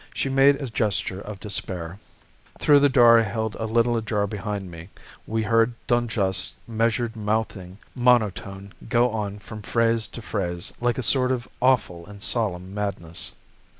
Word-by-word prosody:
She 135 - -1
made 135 +1 +4
a 140 - -4
gesture 105 -4 -1
of 105 -2 -8
despair. 95 -3 -2 0.6
"Through 145 -1 +5
the 145 0 +4
door 120 -3 +7
I - - +4
held 110 0 -2
a 110 - -2
little 115 +2 +2
ajar 110 -2 0
behind 100 -2 -5
me, 85 +2 -10 0.4
we 110 0 -1
heard 115 +2 +2
Dun 120 0 +1
Juste's 95 -4 0
measured 115 +1 0
mouthing 105 -4 -3 0.2
monotone 105 -6 +1 0.2
go 120 0 +3
on 105 -2 -3
from 105 +1 -10
phrase 115 +1 +1
to 120 - -9
phrase, 90 -6 -2
like 120 0 +1
a 130 - -2
sort 130 +2 +3
of 125 -2 -2
awful 120 -10 +2
and 100 0 -11
solemn 95 -6 -1
madness. 100 -5 -4
110 Hz, 160 wpm, -24 LUFS, 100-120 Hz, 0.6 s, door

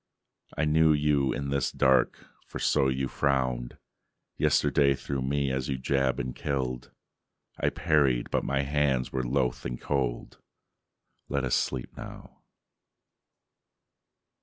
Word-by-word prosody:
I 75 - +1
knew 80 +1 +4
you 75 -2 +2
in 70 -1 -3
this 70 -2 0
dark 65 -1 +2 0.2
for - - -7
so 65 - +2
you 65 0 -1
frowned 65 -3 -1 0.6
Yesterday 70 -1 +3
through 70 0 -4
me 70 +1 0
as 65 0 -2
you 65 - -1
jabbed 65 0 0
and 65 0 -4
killed. 65 -3 -3 0.7
I - - +2
parried, 70 -7 +1
but - - +1
my 70 +1 0
hands 70 -3 0
were 65 - -1
loath 60 0 -1
and - - -4
cold. 65 -4 -2 0.9
Let 70 -1 -1
us 65 - -1
sleep 65 -2 -1
now..." - - -11
65 Hz, 130 wpm, -28 LUFS, 65-70 Hz, 0.9 s, knew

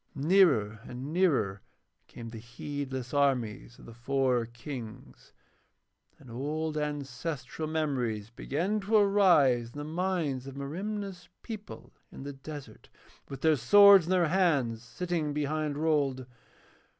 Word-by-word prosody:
Nearer 140 - +3
and 130 +5 -7
nearer 135 - +1 0.5
came 115 -1 -9
the 115 -1 -8
heedless 130 +2 -6
armies 125 -5 0
of - - -15
the 115 - -11
four 125 0 0
Kings, 120 -1 -9 0.9
and 130 -4 -14
old 155 +5 -3
ancestral 145 0 -4
memories 125 -9 -2
began 175 - -2
to 210 +2 -1
arise 175 - +4
in - - -10
the 145 - -4
minds 160 -5 -2
of 135 - -8
Merimna's 190 +5 -5
people 215 -2 -9 0.2
in - - -9
the 140 0 -6
desert 135 -4 -10 0.4
with 135 -1 -8
their 160 -1 +4
swords 200 - +7
in - - -4
their 180 -3 +3
hands 145 -11 +1
sitting 150 +6 -3
behind 150 0 -2
Rold. 145 -5 0
145 Hz, 125 wpm, -29 LUFS, 125-165 Hz, 0.9 s, swords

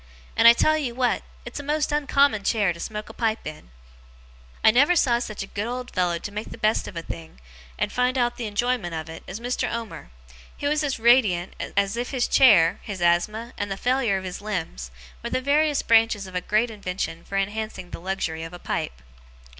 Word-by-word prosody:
And - - +6
I 235 - +11
tell 310 +6 +3
you 250 -5 -3
what 250 -1 +1 0.2
it's - - -6
a - - -6
most 300 +1 0
uncommon 280 -6 +2
chair 205 -4 +2
to 170 - -13
smoke 210 +3 -5
a - - -10
pipe 225 -1 -1
in.' 150 - -8 0.9
I - - +8
never 285 +9 +4
saw 245 -7 +3
such 215 -4 -5
a - - -6
good 205 +2 -4
old 250 +1 -5
fellow 175 -2 +1
to 200 - -7
make 210 +2 -5
the - - -9
best 215 +1 +1
of 175 - -8
a 165 - -4
thing, 80 - -9 0.4
and - - -1
find 250 +1 +1
out 240 -1 +1
the 235 - -3
enjoyment 210 -4 -1
of 160 0 -5
it, 160 - -10
as 190 +4 -6
Mr. 245 +2 -2
Omer. 230 - -6 0.5
He - - -6
was 300 +1 +1
as 280 -3 -1
radiant, 225 -7 +3 0.2
as 200 +2 +1
if 245 +1 -2
his 255 -3 0
chair, 190 -11 +5
his 200 -3 -6
asthma, 210 +8 +1
and 205 - -2
the 195 - -3
failure 245 -3 +1
of 190 - -5
his 185 +1 -6
limbs, 165 - -4 0.3
were - - -3
the - - 0
various 290 +2 +2
branches 225 -3 +3
of 185 - -11
a 180 - -1
great 215 +5 +1
invention 180 -5 -4
for 195 - -4
enhancing 205 -2 -3
the - - -6
luxury 175 -3 -3
of 165 +1 -7
a - - -7
pipe. 60 - -4
215 Hz, 215 wpm, -24 LUFS, 180-245 Hz, 0.9 s, I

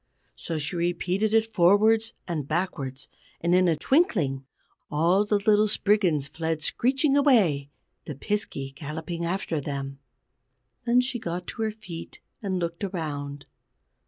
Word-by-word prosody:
So 165 - -4
she 155 +4 -3
repeated 180 +4 0
it 225 0 +2
forwards 215 +5 +4
and 155 -6 -3
backwards, 145 -6 -3 0.3
and 170 +1 +1
in 185 0 +5
a 165 - +3
twinkling 155 - +1 0.4
all 170 +7 +3
the 210 0 +2
little 210 +1 +3
Spriggans 195 -9 +2
fled 160 +1 -3
screeching 270 - +2
away, 205 - +3 0.4
the 150 - -6
Piskey 140 - -3
galloping 160 +3 -5
after 170 -3 -2
them. 140 -1 -5 0.9
Then 245 +1 +4
she 250 -1 -3
got 175 -3 -4
on 225 - -2
her - - 0
feet 185 -6 -9 0.2
and 195 -3 -1
looked 170 +1 -3
around. 145 -7 -4
175 Hz, 135 wpm, -26 LUFS, 150-210 Hz, 0.9 s, in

